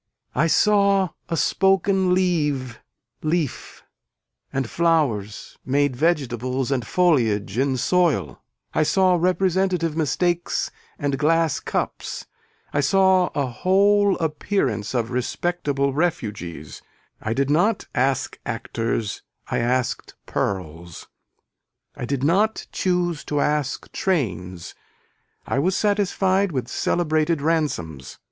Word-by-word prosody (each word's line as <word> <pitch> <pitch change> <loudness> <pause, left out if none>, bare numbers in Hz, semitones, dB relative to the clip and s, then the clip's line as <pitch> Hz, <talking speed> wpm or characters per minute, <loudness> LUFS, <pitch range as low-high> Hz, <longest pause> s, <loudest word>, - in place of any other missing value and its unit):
I 150 +5 +2
saw 200 0 +3 0.2
a 165 - -1
spoken 190 0 +2
leave 150 -9 0 0.4
leaf 155 -3 -2 0.7
and 135 -2 -1
flowers 140 -11 0
made 140 0 +1
vegetables 130 -4 0
and 125 -5 -1
foliage 115 - +2
in 135 -1 +1
soil. 175 +4 +1 0.3
I - - +2
saw 185 +4 +3
representative 180 -1 +1
mistakes 175 +3 0 0.3
and 140 -2 -1
glass 160 -1 +2
cups, - - -4 0.5
I 145 - +1
saw 185 +5 +4
a 145 - +1
whole 195 +9 +3
appearance 150 - -1
of 120 -1 -1
respectable 140 +1 -1
refugees, 105 - -3 0.4
I 110 +1 -2
did 140 +1 +1
not 190 +9 +2
ask 135 +1 0
actors 115 -2 -3 0.3
I - - +1
asked 125 +1 -1
pearls, 85 -3 -4 0.9
I - - -5
did 135 +1 -2
not 200 +9 +2
choose 175 -3 0
to 145 - -1
ask 150 -2 -1
trains, 95 - -2 0.7
I - - -1
was 180 +6 +1
satisfied 200 -2 +1
with 130 -5 -2
celebrated 155 +3 0
ransoms. 115 - -2
150 Hz, 105 wpm, -23 LUFS, 125-180 Hz, 0.9 s, saw